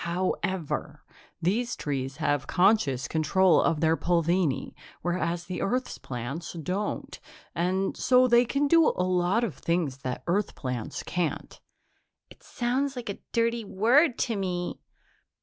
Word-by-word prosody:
"However, 180 -1 -2 0.4
these 230 +7 0
trees 135 -2 -3
have 145 -3 0
conscious 150 - +2
control 165 +5 +3
of 160 -2 +1
their 160 0 +4
pulvini, 170 -3 0 0.3
whereas 175 -1 -1
the 180 +1 -4
Earth's 250 +5 -1
plants 130 +7 -5
don't, 185 +5 -4 0.3
and 185 +3 0
so 255 0 +4
they 240 0 +5
can 280 +4 0
do 330 +1 +5
a 180 - +1
lot 185 +5 +1
of 215 -9 -1
things 165 -6 -1
that 130 -2 -5
Earth 195 +4 0
plants 125 -4 -4
can't." 175 -3 -3 0.7
"It - - -16
sounds 260 +3 -1
like 245 -3 -6
a - - -9
dirty 230 0 +1
word 240 - +3
to 230 - -2
me." 180 -3 -3
180 Hz, 135 wpm, -27 LUFS, 160-230 Hz, 0.7 s, they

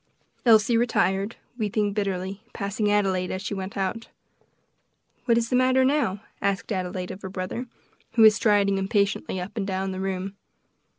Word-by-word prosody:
Elsie 225 +1 +6
retired, 205 -3 +1 0.2
weeping 210 -1 0
bitterly, 195 -1 -2
passing 205 0 -1
Adelaide 190 -3 +1
as 185 - -3
she 200 +1 -4
went 195 0 -5
out. 195 +4 -2 1.2
"What 235 -2 +4
is 230 +1 -1
the - - +3
matter 260 +1 +4
now?" 260 -9 +1 0.2
asked 200 +2 -1
Adelaide 185 -1 -3
of 190 - -9
her 190 - -6
brother, 185 +6 -4 0.5
who 225 -1 +5
was 215 -1 +9
striding 205 -3 +2
impatiently 200 -1 0
up 180 +4 -6
and 200 -3 -2
down 190 0 -2
the 185 - -5
room. 190 0 -3
200 Hz, 160 wpm, -25 LUFS, 190-220 Hz, 1.2 s, was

